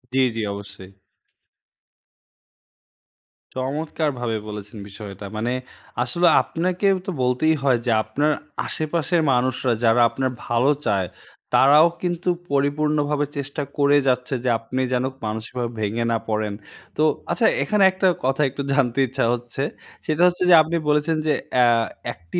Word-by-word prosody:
জি, -, -, +3 dB, 0.2 s
জি, 115 Hz, -, -2 dB
অবশ্যই। 100 Hz, -2 st, -10 dB, 2.7 s
চমৎকারভাবে 135 Hz, -3 st, -2 dB
বলেছেন 105 Hz, 0 st, -8 dB
বিষয়টা। 100 Hz, 0 st, -9 dB
মানে 115 Hz, +3 st, -1 dB, 0.5 s
আসলে 170 Hz, +8 st, +1 dB
আপনাকেই 185 Hz, +4 st, 0 dB
তো -, -, -1 dB
বলতেই 125 Hz, +6 st, +2 dB
হয় 130 Hz, -3 st, +3 dB
যে, 120 Hz, -, +1 dB
আপনার 145 Hz, +8 st, 0 dB, 0.3 s
আশেপাশের 165 Hz, +2 st, -1 dB
মানুষরা 125 Hz, 0 st, +1 dB
যারা 115 Hz, +1 st, +4 dB
আপনার 130 Hz, +2 st, -2 dB, 0.2 s
ভালো 120 Hz, +3 st, +2 dB, 0.2 s
চায়, 95 Hz, -3 st, +1 dB, 0.5 s
তারাও 150 Hz, +5 st, +6 dB
কিন্তু 175 Hz, 0 st, -1 dB, 0.2 s
পরিপূর্ণভাবে 145 Hz, +1 st, +1 dB
চেষ্টা 140 Hz, +1 st, -4 dB, 0.2 s
করেই 145 Hz, 0 st, +4 dB
যাচ্ছে 125 Hz, +1 st, 0 dB
যে, 125 Hz, -, +1 dB
আপনি 125 Hz, +3 st, -3 dB
যেন 125 Hz, -, +1 dB, 0.2 s
মানসিকভাবে 115 Hz, +3 st, -4 dB
ভেঙে 110 Hz, +3 st, -1 dB
না 115 Hz, -, +2 dB
পড়েন। 110 Hz, -1 st, -1 dB, 0.4 s
তো -, -, 0 dB, 0.3 s
আচ্ছা, 235 Hz, -, +1 dB, 0.2 s
এখানে 210 Hz, -2 st, +2 dB
একটা 190 Hz, 0 st, +1 dB, 0.2 s
কথা 135 Hz, +2 st, +1 dB
একটু 140 Hz, +2 st, -6 dB
জানতে 135 Hz, -2 st, +1 dB
ইচ্ছা 130 Hz, 0 st, -1 dB
হচ্ছে, 120 Hz, +2 st, -4 dB, 0.4 s
সেটা 155 Hz, +1 st, 0 dB
হচ্ছে 180 Hz, +1 st, 0 dB
যে -, -, +8 dB
আপনি 160 Hz, +2 st, -2 dB
বলেছেন 150 Hz, +2 st, +2 dB
যে, 150 Hz, -, +3 dB, 0.3 s
আ -, -, +7 dB, 0.5 s
একটি 85 Hz, -, -5 dB
135 Hz, 135 wpm, -22 LUFS, 115-155 Hz, 2.7 s, যে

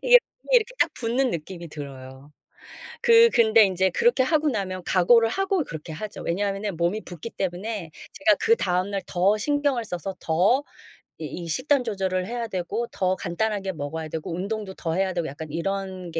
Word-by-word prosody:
이게 -, -, +8 dB, 0.2 s
몸이 -, -, -12 dB
이렇게 485 Hz, +2 st, +1 dB
딱 -, -, +3 dB
붓는 250 Hz, +2 st, 0 dB
느낌이 170 Hz, +1 st, -6 dB
들어요. 140 Hz, -1 st, -10 dB, 0.7 s
그 465 Hz, 0 st, +7 dB
근데 225 Hz, -, +5 dB
인제 190 Hz, 0 st, +1 dB
그렇게 470 Hz, -, +3 dB
하고 305 Hz, +3 st, +2 dB
나면 190 Hz, -6 st, -3 dB
각오를 225 Hz, +5 st, +4 dB
하고 390 Hz, +2 st, 0 dB
그렇게 160 Hz, -, -8 dB
하죠. 210 Hz, +7 st, -7 dB
왜냐하면 200 Hz, +2 st, -2 dB
몸이 175 Hz, +6 st, 0 dB
붓기 175 Hz, +5 st, -7 dB
때문에 190 Hz, -1 st, -4 dB, 0.2 s
제가 200 Hz, +3 st, +3 dB
그다음 190 Hz, -, +1 dB
날 200 Hz, -1 st, -2 dB
더 195 Hz, +4 st, +2 dB
신경을 285 Hz, -1 st, 0 dB
써서 185 Hz, 0 st, -5 dB
더 190 Hz, -, +2 dB, 0.5 s
이 -, -, -8 dB, 0.2 s
이 -, -, -7 dB
식단 255 Hz, -, +1 dB
조절을 190 Hz, -3 st, -1 dB
해야 235 Hz, +1 st, -3 dB
되고 210 Hz, +4 st, -3 dB
더 185 Hz, 0 st, 0 dB
간단하게 195 Hz, +2 st, -2 dB
먹어야 155 Hz, 0 st, -5 dB
되고 160 Hz, +2 st, -5 dB
운동도 200 Hz, +1 st, -4 dB
더 165 Hz, -3 st, -3 dB
해야 190 Hz, 0 st, 0 dB
되고 170 Hz, -2 st, -2 dB
약간 150 Hz, +3 st, -7 dB
이런 185 Hz, +2 st, -3 dB
게 165 Hz, -, -2 dB
195 Hz, 355 characters per minute, -25 LUFS, 170-230 Hz, 0.7 s, 이게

